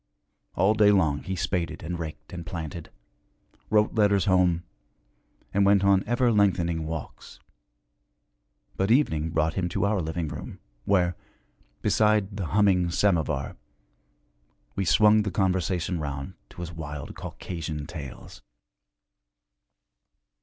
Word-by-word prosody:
All 95 +4 +3
day 105 -1 +5
long 80 -8 +2
he 95 +1 -4
spaded 90 -2 -2
and 85 +1 -4
raked 75 -1 -7
and 85 -1 -6
planted, 85 -1 -6 0.8
wrote 105 0 +3
letters 100 -3 +3
home, 90 -3 +3 0.9
and 100 - +3
went 100 0 +4
on 100 -1 +4
ever 120 +1 +2
lengthening 85 -6 +1
walks; 80 -3 -7 1.4
but 95 +2 0
evening 80 - +2
brought 80 0 0
him 90 -2 -1
to 85 - 0
our 100 -2 +1
living 80 0 -3
room 75 0 -8 0.3
where, 90 -3 +2 0.7
beside 105 -2 +2
the 95 -4 -3
humming 95 -1 +3
samovar, 85 -7 0 1.2
we 95 - -1
swung 105 +4 +5
the 105 - -2
conversation 90 -2 0
round 70 -2 -5 0.2
to - - -10
his 85 -1 -5
wild 75 -2 -7
Caucasian 80 -4 -6
tales. 75 -5 -9
90 Hz, 120 wpm, -26 LUFS, 80-100 Hz, 1.4 s, day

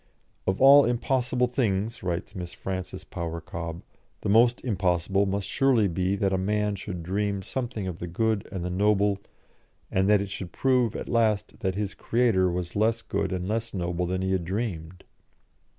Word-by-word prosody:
"Of 95 +1 +1
all 140 +2 +9
impossible 125 +1 +1
things," 115 -4 -1
writes 90 +2 -3
Miss 90 -3 -6
Frances 95 -1 -5
Power 85 -3 -5
Cobbe, 85 0 -6 0.4
"the - - -2
most 120 +4 +4
impossible 95 -2 +1
must 100 0 -1
surely 125 -2 +3
be 90 +2 0
that 100 -1 0
a 95 - +1
man 105 +2 0
should 90 -3 -6
dream 100 +2 -1
something 115 -3 -4
of 90 -3 -5
the 85 - -4
good 110 +4 -1
and 90 -2 -4
the 90 - -2
noble, 100 +1 +2 0.7
and 95 +1 +2
that 105 -1 +6
it 100 0 -4
should 95 -3 -6
prove 125 -2 +2
at - - -5
last 110 -3 +1
that 95 -1 -1
his 100 -1 -2
Creator 115 -6 +2
was 90 0 -4
less 115 +2 +1
good 100 - -2
and 90 0 -2
less 115 +1 -2
noble 90 -1 -1
than 95 +1 -1
he 95 - 0
had 95 -2 +1
dreamed." 90 -3 -4
100 Hz, 180 wpm, -27 LUFS, 90-110 Hz, 0.7 s, all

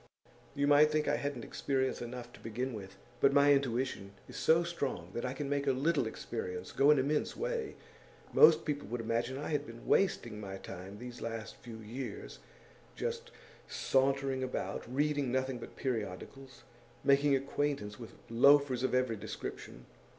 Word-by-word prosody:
You 140 0 +1
might 145 +1 +6
think 150 -1 +1
I - - +2
hadn't 140 -4 -3
experience 130 -1 -1
enough, 120 0 -7
to - - -13
begin 125 +3 -3
with. 100 -2 -8 0.2
But 140 - +4
my 145 0 +6
intuition 125 -7 -1
is - - -11
so 165 +2 +4
strong 140 - -3
that 120 - -3
I 125 - -2
can 140 +1 -4
make 140 0 -1
a 135 - +4
little 140 0 +1
experience 90 -5 -5
go 140 +2 +4
an 150 - +7
immense 145 +3 0
way. 470 -2 -2 0.6
Most 460 - +7
people 145 -2 -2
would 120 +1 -3
imagine 115 +3 -1
I 145 - -4
had 150 -2 -1
been 115 0 -11
wasting 120 - +1
my 95 -1 -6
time 95 +1 -9
these 125 +1 -9
last 115 -1 -5
few 115 -2 -10
years, 115 +5 -7 0.6
just 470 0 -3 0.4
sauntering 135 0 +1
about, 130 -2 -4
reading 145 -1 +1
nothing 130 -1 -1
but - - -10
periodicals, 130 +3 -5 0.4
making 140 +1 +4
acquaintance 135 -6 -2
with 115 - -10
loafers 135 +2 +5
of 130 0 +1
every 125 -3 +1
description. 60 - -7
130 Hz, 165 wpm, -33 LUFS, 115-145 Hz, 0.6 s, an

